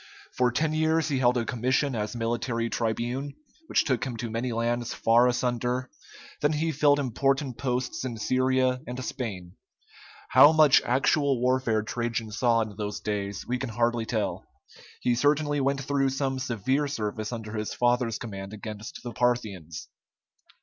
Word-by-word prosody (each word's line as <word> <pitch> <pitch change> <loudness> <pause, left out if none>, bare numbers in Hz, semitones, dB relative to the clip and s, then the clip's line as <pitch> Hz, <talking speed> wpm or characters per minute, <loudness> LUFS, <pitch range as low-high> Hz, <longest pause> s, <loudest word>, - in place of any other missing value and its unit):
For 125 -1 +2
ten 155 +6 0
years 160 0 +1
he 135 -3 0
held 125 -1 +3
a 115 - 0
commission 130 +4 0
as 105 +2 -3
military 115 0 -1
tribune, 120 +5 -2 0.3
which - - +2
took 130 -5 0
him 125 -3 -4
to 115 0 -4
many 120 +2 -2
lands 120 +1 -1
far 120 +2 +4
asunder; 125 0 -1 0.5
then 150 +1 +2
he 160 +2 0
filled 145 -1 +4
important 135 0 0
posts 125 -1 -2
in 120 -3 -4
Syria 130 +2 +1
and 125 +1 -5
Spain. 95 -8 -5 0.7
How 150 - +8
much 155 -3 +6
actual 135 +1 +2
warfare 125 -3 +1
Trajan 115 -1 -3
saw 115 +1 +2
in 110 -2 -4
those 105 -1 -3
days 100 -1 -3
we 125 +1 -2
can 130 - -3
hardly 115 0 0
tell; 110 -3 -2 0.6
he 125 - +2
certainly 145 +3 +2
went 140 +1 0
through 135 0 +1
some 135 0 -2
severe 130 +4 0
service 110 -5 -3
under 110 -2 -6
his 105 -1 -3
father's 120 -2 +1
command 100 -3 -7
against 105 0 -8
the 120 -2 -6
Parthians. 105 -9 -2
125 Hz, 155 wpm, -27 LUFS, 115-135 Hz, 0.7 s, How